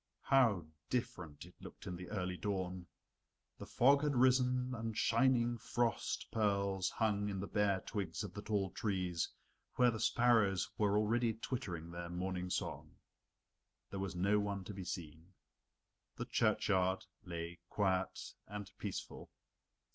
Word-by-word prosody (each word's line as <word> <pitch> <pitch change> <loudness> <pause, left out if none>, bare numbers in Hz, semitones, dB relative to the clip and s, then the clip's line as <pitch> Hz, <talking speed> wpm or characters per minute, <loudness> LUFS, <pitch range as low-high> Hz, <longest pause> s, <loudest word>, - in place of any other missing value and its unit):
How 115 - +4 0.2
different 95 - -3
it 90 - -15
looked - - -10
in 90 - -4
the 90 +1 -8
early 90 -3 -2
dawn! 95 -2 -3 0.7
The - - -7
fog 140 +3 +5
had 145 -2 +1
risen 125 0 +3
and 115 -2 -4
shining 120 0 +3
frost 120 +1 0
pearls 100 -3 +1
hung 105 -2 0
in 100 -1 -3
the 100 - -2
bare 100 -2 +1
twigs 90 -7 -3
of - - -6
the 105 - -6
tall 100 -4 0
trees 90 -5 -1 0.5
where 125 -1 +5
the 110 - -4
sparrows 110 -6 +3
were 105 -3 +2
already 115 +2 +2
twittering 90 -9 -4
their 85 0 -5
morning 90 +1 -3
song. - - -3 1.0
There 100 - -4
was 95 -2 -3
no 100 +4 +3
one 100 -2 -2
to 105 - -7
be 95 -2 -6
seen. 85 0 -7 0.8
The - - -4
churchyard 95 -1 +2 0.2
lay 85 -2 -5
quiet 95 -2 0
and 105 0 -6
peaceful. - - -5
100 Hz, 140 wpm, -36 LUFS, 90-115 Hz, 1.0 s, fog